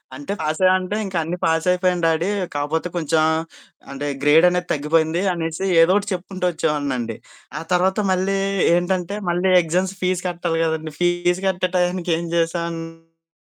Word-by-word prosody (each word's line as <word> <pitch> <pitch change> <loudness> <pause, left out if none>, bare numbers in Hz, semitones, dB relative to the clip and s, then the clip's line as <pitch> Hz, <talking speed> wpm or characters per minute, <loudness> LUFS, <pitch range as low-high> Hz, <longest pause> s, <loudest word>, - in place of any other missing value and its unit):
అంటే 145 +8 -5
"పాస్ 155 +1 -2
అయ్యావ?" 185 0 +6
అంటే 185 +3 -4
ఇంకా 190 -3 -4
అన్ని 175 +3 -4
పాస్ 165 +1 +1
అయిపోయాను 180 -1 +1
డ్యాడీ, 165 +3 +1 0.3
కాకపోతే 150 +4 -1
కొంచెం 160 -1 +1 0.7
అంటే, 145 +1 -4
గ్రేడ్ 155 +4 +5
అనేది 180 0 -2
తగ్గిపోయింది 160 +3 +1
అనేసి 165 +2 -3 0.2
ఏదో 170 +3 +5
ఒకటి 205 0 0
చెప్పుకుంటూ 185 0 -4
వచ్చేవాడినండి. 135 -8 -2 0.4
ఆ - - -5
తర్వాత 185 +2 +2
మళ్ళీ 190 +1 +1 0.4
ఏంటంటే 180 +2 -1
మళ్ళీ 180 +2 +1
ఎగ్జామ్స్ 185 +4 -1
ఫీస్ 180 -1 0
కట్టాలి 170 -2 -2
కదండీ 160 -1 -3
ఫీస్ 175 +1 +1
కట్టే 185 -1 0
టయానికి 180 0 0
ఏం 170 - -4
జేసానంటే 165 -1 -4
170 Hz, 150 wpm, -21 LUFS, 160-180 Hz, 0.7 s, అయ్యావ